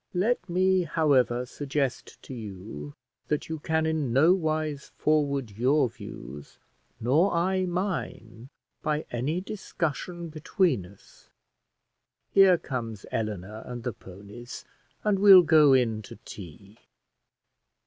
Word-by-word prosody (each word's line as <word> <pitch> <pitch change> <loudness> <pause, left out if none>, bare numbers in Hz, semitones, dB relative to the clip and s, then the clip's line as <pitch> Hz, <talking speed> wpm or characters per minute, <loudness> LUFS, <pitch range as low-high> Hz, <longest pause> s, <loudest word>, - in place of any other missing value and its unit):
Let 195 +1 0
me, 185 +1 +3
however, 140 -7 +2
suggest 140 0 -3
to - - -9
you, 95 - -8 0.3
that 150 +1 -2
you 160 -1 -4
can 160 +1 0
in 155 -5 -1
no 150 +8 +5
wise 155 -5 -2
forward 140 -6 +1
your 130 +6 +2
views 75 - -10 0.4
nor 150 - +3
I 185 +2 +1
mine, 170 - -4 0.3
by 150 0 -1
any 140 +9 -1
discussion 175 -3 -4
between 155 - 0
us. 100 +2 -20 1.0
Here 195 -2 +6
comes 115 -8 -5
Eleanor 105 -1 -4
and 120 -1 -6
the 125 - -3
ponies, 100 +7 -11 0.4
and 210 -2 +1
we'll 195 -2 +9
go 155 -4 +6
in 115 -4 +2
to 105 - -11
tea." 100 +3 -11
140 Hz, 120 wpm, -27 LUFS, 115-170 Hz, 1.0 s, we'll